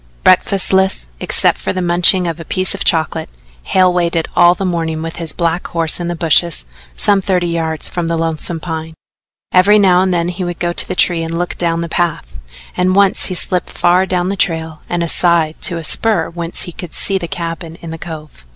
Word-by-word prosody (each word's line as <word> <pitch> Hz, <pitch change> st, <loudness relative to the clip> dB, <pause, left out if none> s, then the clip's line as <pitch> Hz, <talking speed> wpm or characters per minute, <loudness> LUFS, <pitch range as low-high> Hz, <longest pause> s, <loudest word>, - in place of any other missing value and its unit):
Breakfastless, 190 Hz, -, +2 dB
except -, -, +1 dB
for -, -, -3 dB
the 185 Hz, -, -3 dB
munching 175 Hz, +1 st, +4 dB
of 165 Hz, 0 st, -4 dB
a -, -, -7 dB
piece 185 Hz, +4 st, -1 dB
of 200 Hz, -, -4 dB
chocolate, 160 Hz, -, 0 dB, 0.3 s
Hale 185 Hz, -, +2 dB
waited 170 Hz, -2 st, 0 dB
all 175 Hz, +1 st, +5 dB
the 195 Hz, -, -4 dB
morning 165 Hz, -3 st, -2 dB
with 165 Hz, +1 st, -6 dB
his 165 Hz, -2 st, -3 dB
black 170 Hz, 0 st, -2 dB
horse 165 Hz, -1 st, +1 dB
in 175 Hz, -, -3 dB
the 175 Hz, -, -3 dB
bushes 165 Hz, -, +3 dB, 0.3 s
some 200 Hz, -1 st, +2 dB
thirty 185 Hz, -2 st, 0 dB
yards 165 Hz, -2 st, -2 dB
from 175 Hz, -2 st, -3 dB
the 165 Hz, 0 st, -1 dB
Lonesome 165 Hz, +1 st, -2 dB
Pine. 160 Hz, -1 st, -6 dB, 0.6 s
Every 195 Hz, +3 st, +5 dB
now 185 Hz, -3 st, +4 dB
and 190 Hz, 0 st, +1 dB
then 175 Hz, -1 st, 0 dB
he 180 Hz, +1 st, -5 dB
would 175 Hz, -1 st, -4 dB
go 175 Hz, 0 st, -2 dB
to -, -, +5 dB
the 185 Hz, -, -4 dB
tree 175 Hz, -2 st, +2 dB
and 165 Hz, 0 st, -4 dB
look 175 Hz, +1 st, -3 dB
down 170 Hz, -1 st, -1 dB
the 170 Hz, -, -3 dB
path, 160 Hz, -, -3 dB, 0.4 s
and 185 Hz, +1 st, +1 dB
once 200 Hz, -1 st, +3 dB
he 185 Hz, -, -3 dB
slipped 180 Hz, +1 st, 0 dB
far 180 Hz, +2 st, +2 dB
down 180 Hz, -1 st, -1 dB
the 200 Hz, -, -2 dB
trail 160 Hz, -4 st, -2 dB
and 175 Hz, -1 st, -1 dB
aside 170 Hz, -2 st, +1 dB
to 180 Hz, -5 st, +1 dB
a 165 Hz, -, -6 dB
spur 190 Hz, 0 st, +1 dB
whence 170 Hz, 0 st, -3 dB
he 175 Hz, -, -7 dB
could 175 Hz, 0 st, -9 dB
see 195 Hz, -1 st, 0 dB
the 170 Hz, -, -5 dB
cabin 165 Hz, -2 st, -6 dB
in 170 Hz, -1 st, -9 dB
the 165 Hz, -, -7 dB
cove. 155 Hz, -, -10 dB
175 Hz, 215 wpm, -15 LUFS, 165-180 Hz, 0.6 s, all